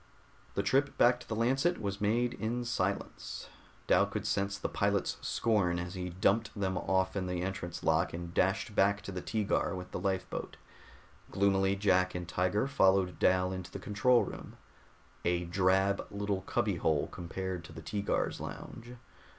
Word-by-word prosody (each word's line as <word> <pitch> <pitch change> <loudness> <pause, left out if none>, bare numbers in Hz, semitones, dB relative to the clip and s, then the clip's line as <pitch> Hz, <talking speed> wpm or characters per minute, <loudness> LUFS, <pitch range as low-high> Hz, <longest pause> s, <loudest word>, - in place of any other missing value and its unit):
The - - +1
trip 140 +2 +2
back 120 +1 +5
to - - -13
the 110 - -1
Lancet 135 +10 +2
was 100 -1 -3
made 120 +4 +2
in 120 +1 -2
silence. 100 -4 -3 0.4
Dal - - +4
could - - -4
sense 100 0 0
the - - -2
pilot's 100 -1 0
scorn 100 -7 +1
as 90 0 -4
he 90 -1 -4
dumped 100 +4 +1
them 95 -1 0
off 95 +1 0
in 95 -2 -1
their 90 0 -2
entrance 85 -3 -5
lock, - - +2
and 85 0 -6
dashed 95 +5 +1
back 100 +1 +3
to 100 - -6
the 90 -1 -4
Teegar 105 -2 0
with 90 0 -7
the - - -3
lifeboat. 95 -2 -3 0.7
Gloomily 95 0 +2
Jack 95 -2 +2
and 90 -1 -4
Tiger 90 +5 +1
followed 95 -8 +3
Dal 90 0 +3
into 95 -1 -5
the - - -7
control 120 +5 +3
room, - - -8 0.7
a 85 0 +1
drab 95 +2 +2
little 100 -1 -2
cubby - - 0
hole 75 -3 +1
compared 90 0 -4
to - - -11
the - - -9
Teegar's 100 -1 -1
lounge. 120 +2 -8
95 Hz, 165 wpm, -32 LUFS, 90-105 Hz, 0.7 s, back